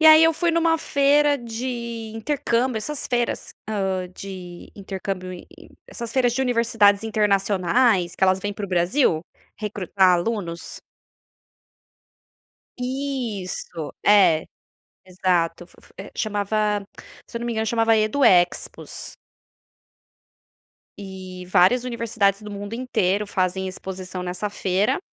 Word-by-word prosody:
E 315 - +6
aí, 315 0 +9
eu 325 0 +4
fui 340 +2 +1
em 335 - +2
uma 330 0 +3
feira 285 0 +3
de 235 -1 -5
intercâmbio, 250 0 0
essas 295 +6 -4
feiras, 240 -1 -1 0.2
hã, 190 -3 -1
de 185 -3 -9
intercâmbio 190 -2 -5
int 180 - -10
int - - -15 0.2
essas 235 -1 -6
feiras 245 -2 +2
de 265 - +1
universidades 230 -5 +3
internacionais, 200 -2 +2
que - - -10
elas 185 0 +3
vêm 205 +1 -3
para 200 0 -5
o - - -14
Brasil, 175 - +2 0.4
recrutar 195 -3 +1
alunos. 175 -2 -2 2.0
Isso. 245 - -4
É, 195 -6 +6 0.6
exato. 175 -2 0
Fo - - -21
fo - - -22
é 195 - -9
chamava 210 0 0 0.4
se 235 - -5
eu - - -9
não 235 - -4
me 240 - -1
engano 220 0 -1
chamava 225 0 +3
Edu 215 +6 +1
Expos. 175 -4 +1 1.8
Eh 185 -2 -8
várias 190 +8 +4
universidades 230 -5 0
do 210 -1 -9
mundo 205 +1 -7
inteiro 210 -5 0
fazem 190 -1 -1
exposição 185 0 -6
nessa 180 +3 -3
feira. 200 +5 0
210 Hz, 130 wpm, -23 LUFS, 185-240 Hz, 2.0 s, aí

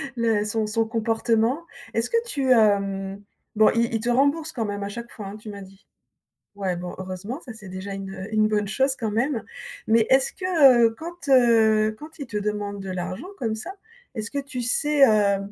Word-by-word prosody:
le 225 -3 +1
son 215 0 -1
son 225 +1 0
comportement. 225 +5 0 0.3
Est-ce 230 +1 0
que 465 0 +1
tu, 275 - +2
heu 200 -3 +2 0.4
bon, 215 0 +6
il 235 0 +1
il 225 - +1
te 235 - -2
rembourse 285 +6 +2
quand 235 -7 -3
même 205 -1 -4
à 200 - -4
chaque 235 +3 -8
fois, 205 -3 -8
hein, 200 +2 -8
tu 215 0 -10
m'as 200 -1 -8
dit. 195 0 -15 0.7
Ouais, 190 -3 -2
bon, 175 0 -6
heureusement, 190 - -6
ça, 245 -7 -10
c'est 210 -3 -12
déjà 190 +2 -6
une, 195 0 -6
heu 190 +2 -7
une 215 0 +4
bonne 210 -1 0
chose 265 +5 +1
quand 225 -5 -2
même. 235 +3 0 0.4
Mais 225 0 +4
est-ce 265 0 +4
que, 370 - -9 0.4
heu, 225 -1 +3
quand, 340 -2 -8
heu 220 -4 +4
quand 315 +2 -12
il 280 - -6
te 220 - -6
demande 205 -1 -2
de 190 - -6
l'argent 185 - -5
comme 225 -4 -1
ça, 220 +11 -6 0.4
est-ce 220 -2 -4
que 285 - -3
tu 270 -3 -6
sais, 280 +3 +3
heu, 205 -2 +3
220 Hz, 210 wpm, -24 LUFS, 200-250 Hz, 0.7 s, bon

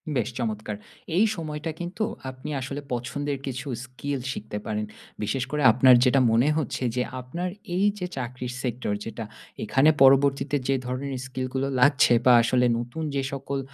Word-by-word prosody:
বেশ 125 -3 0
চমৎকার। 110 -3 -3 0.4
এই 210 - +6
সময়টা 155 -2 -4
কিন্তু 175 +5 -3 0.3
আপনি 130 +2 -8
আসলে 140 +2 -5
পছন্দের 140 +4 -3
কিছু 130 +1 -5 0.2
স্কিল 135 +2 -4
শিখতে 105 -3 -5
পারেন। 105 0 -2 0.4
বিশেষ 115 +5 -1
করে 150 0 -1
আপনার 125 +2 +7
যেটা 130 +1 +4
মনে 115 +5 +4
হচ্ছে 140 -4 -2
যে 125 - +1 0.2
আপনার 170 +9 -4 0.3
এই 190 +3 +2
যে 180 - -2
চাকরির 125 0 -4
Sector 120 -4 -2
যেটা, 115 0 -5 0.4
এখানে 135 +7 +4
পরবর্তীতে 135 +1 +5
যে 135 - +3
ধরণের 130 +1 -3
স্কিলগুলো 130 +1 -3
লাগছে 140 0 +5
বা 125 - +8
আসলে 125 +2 +2
নতুন 120 +7 -5
যে 140 - +1
সকল 140 0 -3
130 Hz, 155 wpm, -25 LUFS, 125-140 Hz, 0.4 s, বা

